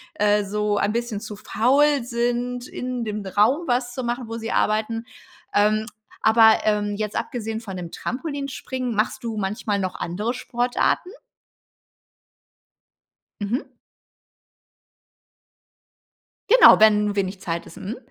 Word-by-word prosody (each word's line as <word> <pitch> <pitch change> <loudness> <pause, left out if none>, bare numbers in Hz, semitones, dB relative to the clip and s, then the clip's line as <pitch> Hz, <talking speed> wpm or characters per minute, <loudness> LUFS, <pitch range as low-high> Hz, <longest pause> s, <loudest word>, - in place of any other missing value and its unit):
äh, 210 -4 +2
so 210 +1 -1
ein 205 - +1
bisschen 235 -3 -2
zu 215 -1 -7
faul 275 +6 +2
sind 245 +1 -2
in 250 -1 -4
dem 210 -1 -4
Raum 230 - +2
was 245 0 0
zu 255 - -4
machen 240 0 -3
wo 225 +1 -5
sie 225 0 -5
arbeiten. 220 +2 0 0.5
Ähm, 215 +1 +3 0.4
aber 220 0 +6
ähm, 205 -1 +1
jetzt 210 -1 -3
abgesehen 225 -1 -3
von 195 -5 -7
dem 175 -2 -7
Trampolinspringen 265 -3 -4
machst 215 +3 -1
du 225 -2 -4
manchmal 205 +1 -2
noch 185 -1 -3
andere 210 +8 -3
Sportarten? 250 +7 -1 2.3
Mhm. 230 +7 -2 2.8
Genau, - - +8
wenn 210 -1 +5
wenig 195 -1 -2
Zeit 170 -2 -3
ist, - - -14
mhm. 210 +6 -6
225 Hz, 125 wpm, -23 LUFS, 210-245 Hz, 2.8 s, Genau